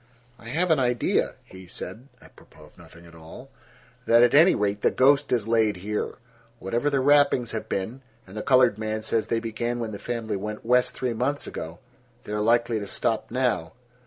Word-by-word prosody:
"I 115 - -13
have 165 +8 0
an 155 - +4
idea," 125 -2 0
he 95 -1 -13
said, 100 +9 -9 0.2
apropos - - -18
of - - -18
nothing 85 +1 -15
at 85 - -16
all, 85 +12 -13 0.6
"that 115 +1 +6
at 120 - +4
any 160 +6 +6
rate 100 0 -1
the - - +4
ghost 140 +2 +3
is 115 -4 0
laid 110 -2 +2
here. 105 +3 -3 0.4
Whatever 120 +7 -1
the 140 -2 +1
rappings 140 -3 +3
have 110 - -5
been—and 110 0 -7
the 110 - -3
colored 125 -4 +3
man 110 0 -3
says 110 0 0
they 115 - 0
began 120 +1 -3
when 115 -2 -4
the 100 - -7
family 115 -3 -3
went 105 +3 -6
west 125 +1 +2
three 125 -2 -2
months 130 +5 -2
ago—they 120 +8 -11
are 105 - -1
likely 115 +1 +2
to 100 - -6
stop - - -2
now." 80 +4 -1
115 Hz, 190 wpm, -25 LUFS, 105-125 Hz, 0.6 s, that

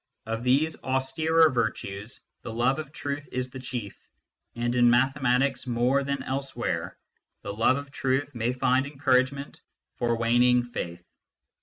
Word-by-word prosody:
Of 115 +1 -3
these 140 +6 +2
austerer 155 +5 +2
virtues 110 -2 -3 0.2
the 115 - -6
love 125 +6 +1
of 150 -2 -6
truth 145 -1 -5
is 125 0 -3
the 130 - -7
chief, 125 -5 -5 0.6
and 120 0 -1
in 120 -1 +5
mathematics, 130 +1 +2
more 125 +3 +2
than 140 -1 -2
else 135 +1 -3
where, - - -3 0.5
the 100 - -4
love 115 +5 +3
of 140 -1 -7
truth 135 +2 -1
may 120 0 0
find 130 +1 +1
encouragement 140 -1 0 0.4
for 120 -1 +1
wan 115 +1 +2
ing 125 0 +4
faith. 90 -8 -6
130 Hz, 150 wpm, -27 LUFS, 120-140 Hz, 0.6 s, in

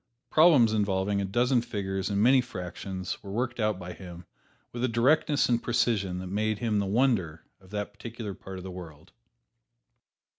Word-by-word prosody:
Problems 150 -9 +6
involving 100 -1 +1
a - - -1
dozen 120 +5 +2
figures 95 -4 -3
and 100 -1 0
many 130 +2 +6
fractions 95 -3 -6
were 100 - -10
worked 120 +4 -2
out 105 -3 +1
by 90 -1 -7
him 90 -2 -10 0.5
with 120 0 -4
a - - +3
directness 140 +5 +3
and 120 -1 +1
precision 100 -6 0
that 90 - -5
made 105 +3 -1
him 110 -1 0
the 100 - -1
wonder 100 -8 +1 0.2
of 95 - -19
that 105 0 -4
particular 110 0 -7
part 95 0 -9
of 90 - -8
the 95 - -7
world. 80 -4 -11
105 Hz, 175 wpm, -28 LUFS, 95-120 Hz, 0.5 s, Problems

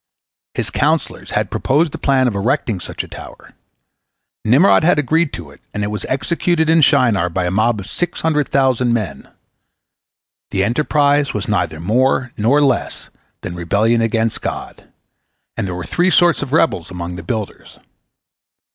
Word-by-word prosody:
His - - -2
counsellors - - -1
had - - -1
proposed 150 +4 +1
the - - -7
plan 130 -2 +2
of 120 - -1
erecting 100 0 -1
such - - -5
a - - -11
tower, - - -12 0.9
Nimrod 140 - +4
had 170 -1 +4
agreed 155 +3 +1
to 80 -4 -8
it, 70 - -19
and 105 - -2
it 105 - -2
was 105 - -4
executed 160 +3 0
in 165 0 +4
Shinar 110 - +3
by 90 +2 -2
a 90 - -1
mob 110 +3 +1
of 95 - -7
six 175 - -3
hundred 150 -3 0
thousand 130 -3 +2
men. 110 -4 -4 1.2
The 95 - 0
enterprise 145 +4 +1
was - - -3
neither 85 -7 -1
more 130 +7 +1
nor 130 +8 +2
less 135 -4 -1 0.3
than 90 - -6
rebellion 105 +7 +1
against 115 0 0
God, - - -6 0.7
and - - -3
there 90 - -4
were 90 -2 -5
three 175 - +1
sorts 175 -2 +3
of 140 -3 -5
rebels 150 - +1
among 90 -1 -6
the 85 - -7
builders. 105 +4 -6
120 Hz, 165 wpm, -18 LUFS, 100-145 Hz, 1.2 s, Nimrod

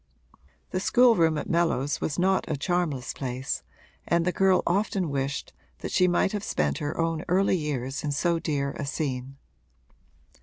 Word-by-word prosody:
The 185 - 0
schoolroom 190 -8 +4
at - - -4
Mellows 165 -5 +1
was 145 - -2
not 190 0 +1
a 155 - -1
charmless 155 -6 -1
place 130 0 -3 0.5
and 170 0 +2
the 180 - +2
girl 190 0 +3
often 190 -3 0
wished 140 0 -3 0.3
that - - -4
she 180 - +4
might 175 +2 +2
have 205 -1 -3
spent 75 - 0
her 145 +1 -3
own 165 0 0
early 190 +2 +3
years 140 -5 -3
in 150 - -1
so 170 +4 +1
dear 140 -3 -1
a 145 - -2
scene. 135 -3 -3
160 Hz, 160 wpm, -27 LUFS, 140-180 Hz, 0.5 s, schoolroom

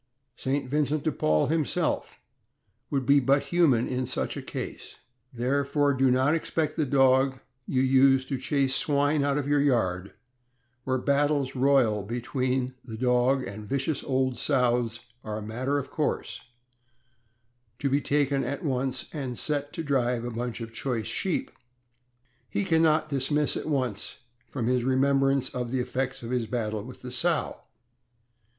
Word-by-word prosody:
St. 135 +2 -2
Vincent 150 +2 0
de 155 - +1
Paul 75 - +2
himself 160 +2 -1 0.7
would 135 -2 -1
be 140 +2 +5
but 140 +2 +2
human 145 -10 +4
in 130 -1 -2
such 130 - -3
a - - -4
case; - - -7 0.4
therefore, 140 +3 +1
do 135 0 +3
not 130 +4 +3
expect 160 -1 -1
the 155 -3 0
dog 130 0 +3 0.3
you 130 -1 +1
use 135 0 +4
to 135 -1 -3
chase 135 0 +1
swine 145 +1 +2
out 140 0 +1
of 145 -1 -2
your 145 0 +3
yard, 100 -9 0 0.7
where 130 0 +1
battles 140 0 +1
royal 130 -5 +3
between 125 +4 -2
the 115 -3 -8
dog 125 +2 +2
and 105 0 -7
vicious 140 +3 -1
old 130 -2 0
sows 120 -4 +1 0.2
are 105 -1 -4
a - - -5
matter 125 +6 -2
of 140 - -4
course, - - -2 1.3
to 140 - -1
be 140 +2 +2
taken 140 -1 +1
at 140 +3 -4
once 130 -1 -1
and 130 -6 -4
set 145 -1 -1
to 165 - -4
drive 125 -5 0
a 120 - -4
bunch 120 +1 -4
of 115 0 -7
choice 115 -3 -2
sheep; 260 +8 -1 1.0
he 100 0 -1
can 160 +9 +2
not 155 -1 +3
dismiss 145 +1 +1
at - - -4
once 130 -9 -2 0.3
from 130 -5 -3
his 125 0 +1
remembrance 135 +1 +2
the 125 0 -3
effects 130 +1 -3
of 115 - -5
his 125 -3 -1
battle 110 -3 -2
with 125 +3 -11
the 125 - -6
sow. 165 +4 -1
130 Hz, 155 wpm, -27 LUFS, 125-140 Hz, 1.3 s, be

